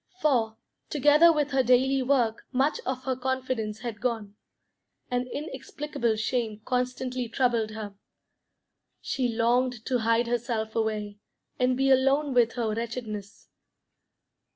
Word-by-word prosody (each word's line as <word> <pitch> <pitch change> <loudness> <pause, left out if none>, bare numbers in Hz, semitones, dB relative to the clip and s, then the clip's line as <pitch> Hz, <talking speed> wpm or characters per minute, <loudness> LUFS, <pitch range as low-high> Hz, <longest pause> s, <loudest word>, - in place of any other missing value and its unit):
For, 235 -8 +1 0.3
together 295 +3 +6
with 300 -2 0
her 270 -1 +3
daily 260 +2 +3
work, 250 -4 +1
much 270 +3 +1
of 260 0 -2
her 260 0 -1
confidence 255 -4 -2
had 235 -4 -5
gone; 225 -5 -2 0.8
an 250 0 0
inexplicable 275 -4 -3
shame 220 -1 -1
constantly 250 -1 -2
troubled 235 -2 +1
her. 210 -2 -6 1.1
She 260 -2 -1
longed 240 +1 +1
to 255 -2 +1
hide 230 +1 +2
herself 235 -2 -2
away, 210 -2 -2 0.4
and 250 0 +2
be 270 0 +3
alone 270 +2 +3
with 240 -2 +3
her 225 -3 -1
wretchedness. 225 -3 -6
245 Hz, 125 wpm, -27 LUFS, 225-260 Hz, 1.1 s, together